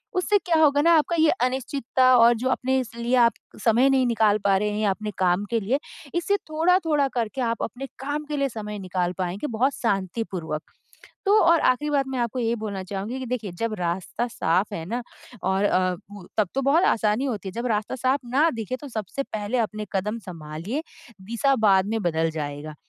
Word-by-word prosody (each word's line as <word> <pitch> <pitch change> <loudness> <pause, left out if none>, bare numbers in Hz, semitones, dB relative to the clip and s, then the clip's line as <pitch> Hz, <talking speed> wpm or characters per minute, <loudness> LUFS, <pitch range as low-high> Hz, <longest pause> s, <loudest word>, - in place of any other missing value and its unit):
उससे 390 +3 +3
क्या 345 -4 0
होगा 290 -1 +5
ना 335 - +4
आपका 325 +3 +1
ये 315 - +5
अनिश्चितता 260 0 0
और 235 +1 +7
जो 255 +3 -1
अपने 260 0 +1
इसलिए 235 0 -2
आप 235 -3 +5 0.3
समय 240 +4 +4
नहीं 265 -2 +3
निकाल 220 -3 +3
पा 195 -1 +4
रहे 210 +1 0
हैं, 210 - -3
या 210 - +2
अपने 210 +2 -3
काम 185 +2 +2
के 230 - +2
लिए। 240 +8 0 0.4
इससे 350 +4 +1
थोड़ा-थोड़ा 320 -3 +2
करके 235 +2 -2
आप 230 -1 -1
अपने 255 +4 -5
काम 290 +3 -3
के 295 -1 -4
लिए 275 -1 +1
समय 210 -2 -6
निकाल 180 -1 -2
पाएँगे 185 +9 -2
बहुत 255 +5 +2
शाँतिपूर्वक, 190 -6 -2 0.7
तो 410 +2 +5
और 335 -1 +5
आख़िरी 290 +4 +2
बात 275 -2 +1
मैं 260 -1 -3
आपको 240 +1 -1
ये 230 -1 +1
बोलना 200 -3 -4
चाहूँगी 200 +7 -5
कि 260 - -5
देखिए, 230 -6 -3
जब 220 +5 -2
रास्ता 180 +6 -2
साफ 195 -2 0
है 165 -5 -4
ना 240 +4 -2 0.4
और 190 +2 +1
अ, 185 -2 +2 0.2
ब 200 -3 -10
तब 210 -4 +3
तो 270 - 0
बहुत 300 +7 +4
आसानी 215 +4 +2
होती 210 -7 -3
है, - - -6
जब 235 +5 -3
रास्ता 210 +4 -2
साफ 260 +3 +1
ना 310 +4 +5
दिखे 255 +4 -3
तो 290 - -7
सबसे 225 +3 -4
पहले 215 +1 -3
अपने 215 -2 -2
कदम 210 +4 -1
सँभालिए, 170 - -5 0.4
दिशा 235 +6 +1
बाद 190 -1 +5
में 225 +1 -1
बदल 165 -2 +1
जाएगा। 150 0 -5
230 Hz, 200 wpm, -24 LUFS, 195-265 Hz, 0.7 s, और